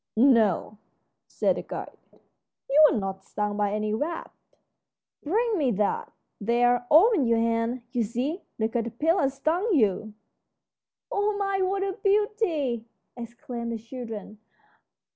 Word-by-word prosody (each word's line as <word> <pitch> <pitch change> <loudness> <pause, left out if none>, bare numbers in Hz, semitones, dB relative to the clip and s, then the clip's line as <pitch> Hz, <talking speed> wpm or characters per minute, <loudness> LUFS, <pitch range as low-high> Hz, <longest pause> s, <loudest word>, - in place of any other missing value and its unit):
"No," 225 -4 +3 0.5
said - - 0
the - - -3
guide, - - -7 0.7
"you're 300 +2 +6
not 195 -2 -3
stung 210 +1 -3
by 205 -1 0
any 215 0 -1
wasp. 315 +9 -3 0.9
Bring 430 +5 0
me 275 -4 +2
that! 205 +1 -1 0.3
There, 245 +3 +2
open 335 - +5
your 230 0 +3
hand. 230 +2 0
You 245 -2 0
see, 255 - -2 0.2
the 220 - +1
caterpillar 245 - 0
stung 330 +10 0
you." 215 -3 +1 1.0
"Oh 410 0 0
my, 395 -1 0
what 390 +1 0
a 395 +2 -3
beauty!" 390 - 0 0.3
exclaimed 235 0 -6
the - - -3
children. 225 -3 -8
245 Hz, 125 wpm, -26 LUFS, 225-340 Hz, 1.0 s, you're